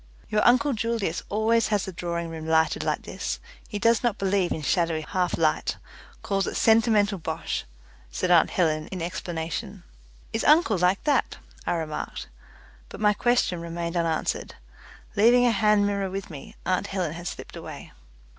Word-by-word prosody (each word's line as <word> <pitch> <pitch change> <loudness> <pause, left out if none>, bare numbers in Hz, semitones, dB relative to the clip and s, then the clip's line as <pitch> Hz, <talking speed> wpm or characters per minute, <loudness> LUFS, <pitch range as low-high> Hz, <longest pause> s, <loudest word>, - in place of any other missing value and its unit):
"Your 210 - +2
uncle 255 +4 +4
Julius 220 -7 -1
always 220 +2 +2
has 205 -3 0
the 190 - -5
drawing 170 -1 -3
room 160 -1 -6
lighted 160 0 +2
like - - -1
this; - - -4 0.3
he 210 - -4
does 230 +2 +3
not 235 -4 0
believe 195 -2 +1
in 155 - -3
shadowy 165 +2 +1
half 180 +2 -1
light 155 -2 +1 0.5
calls 195 -1 0
it - - -4
sentimental 220 -3 +3
bosh," 160 0 -3 0.4
said 65 - -1
aunt 170 -3 +6
Helen 155 -4 0
in 190 - -6
explanation. 165 -2 -4 0.5
"Is - - -1
uncle 300 - +4
like 180 +2 +2
that?" 295 - +1 0.3
I - - +2
remarked, 160 -3 -4 0.6
but - - -9
my 210 -1 +4
question 240 -7 +1
remained 170 0 -4
unanswered. 165 -2 -1 0.6
Leaving 240 +4 +5
a 240 - +4
hand 210 -1 +3
mirror 200 -1 -1
with 195 -1 -6
me, 145 -3 -10
aunt 185 +2 0
Helen 185 -6 -2
had 170 +1 -7
slipped - - -7
away. - - -9
185 Hz, 165 wpm, -26 LUFS, 165-215 Hz, 0.6 s, aunt